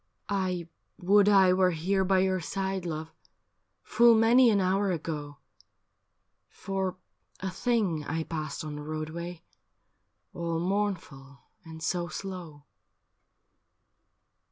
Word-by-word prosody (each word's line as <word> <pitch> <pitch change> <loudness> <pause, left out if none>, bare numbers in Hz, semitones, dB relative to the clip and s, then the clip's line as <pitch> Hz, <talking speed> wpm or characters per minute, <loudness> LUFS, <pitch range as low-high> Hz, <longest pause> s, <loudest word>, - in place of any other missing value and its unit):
' - - -42 0.2
I 175 -2 -3 0.3
would 205 +2 +4
I 190 -3 +6
were 185 0 +4
here 185 +4 0
by 190 0 +3
your 190 0 +1
side, 190 +1 -3
love, 160 0 -5 0.7
Full 235 +1 +5
many 235 +3 +6
an 205 -2 +3
hour 195 +2 +1
ago, 150 -4 -4 1.1
For 190 -1 -3 0.4
a 190 0 -3
thing 205 -9 0
I 160 0 -2
passed 155 -2 -5
on 150 -1 -6
the - - -6
roadway 160 +3 -6 0.9
All 170 -1 -2
mournful 175 -9 -3 0.2
and 160 -1 -10
so 175 0 -1
slow.' 170 -4 -7
180 Hz, 115 wpm, -28 LUFS, 160-195 Hz, 1.1 s, I